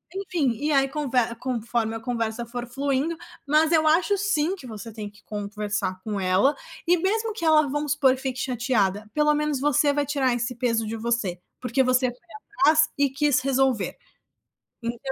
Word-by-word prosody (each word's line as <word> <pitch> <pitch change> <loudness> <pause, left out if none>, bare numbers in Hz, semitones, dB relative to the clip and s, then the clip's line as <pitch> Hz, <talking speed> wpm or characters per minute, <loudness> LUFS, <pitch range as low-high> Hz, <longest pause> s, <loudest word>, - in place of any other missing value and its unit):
enfim, 350 -9 0
e 305 - +1
aí 275 -1 +4
conve 280 -4 -2 0.2
conforme 235 -2 -2
a 225 - -4
conversa 230 -1 -2
for 240 +1 -6
fluindo, 280 +5 -1 0.3
mas 310 +2 +3
eu 315 -2 +4
acho, 345 +6 +3
sim, 375 -3 +1
que 315 -10 -11
você 225 0 -8
tem 210 -1 -6
que 205 0 -21
conversar 205 -2 -3
com 210 -2 -3
ela 185 +10 +3 0.3
e, 355 +1 +5
mesmo 435 +5 0
que 405 - -7
ela, 310 -2 +5
vamos 295 +1 -1
supor 275 -3 +3
que 260 - -11
fique 260 -2 -3
chateada, 225 -6 0
pelo 300 0 +3
menos 300 -2 0
você 290 +1 +3
vai 290 0 0
tirar 270 -3 +1
esse 240 +1 -2
peso 230 -2 0
de 225 - -3
você, 220 -6 -1 0.2
porque 250 +1 +1
você 255 0 +3
foi 245 - -12 0.4
atrás 315 -1 +5
e 280 -1 +3
quis 285 0 +2
resolver. 265 -5 +1 0.9
Então, 235 0 -3
260 Hz, 185 wpm, -25 LUFS, 230-300 Hz, 0.9 s, e